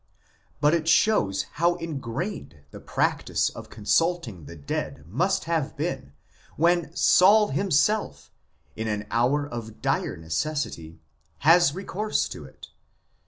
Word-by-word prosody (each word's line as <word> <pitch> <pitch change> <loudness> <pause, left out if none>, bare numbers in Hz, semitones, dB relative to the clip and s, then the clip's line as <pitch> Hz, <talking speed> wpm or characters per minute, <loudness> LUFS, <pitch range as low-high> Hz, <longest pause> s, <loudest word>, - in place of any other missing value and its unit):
But 150 +2 +3
it 165 -2 0
shows 105 - +3 0.2
how 175 +1 +4
ingrained 150 - -5
the - - -10
practice - - 0
of - - -10
consulting 115 - 0
the 85 - -10
dead 70 -1 -5
must 175 - 0
have 160 -5 -2
been 145 - -4 0.4
when 170 0 +2
Saul 205 +3 +5
himself, 200 +3 0 0.4
in 110 0 -4
an 105 -1 -2
hour 130 +6 +2
of 115 -4 -8
dire - - -1
necessity, 80 - -3 0.4
has 165 -1 +5
recourse 200 +3 -2
to - - -8
it. - - -14
150 Hz, 120 wpm, -25 LUFS, 110-175 Hz, 0.4 s, Saul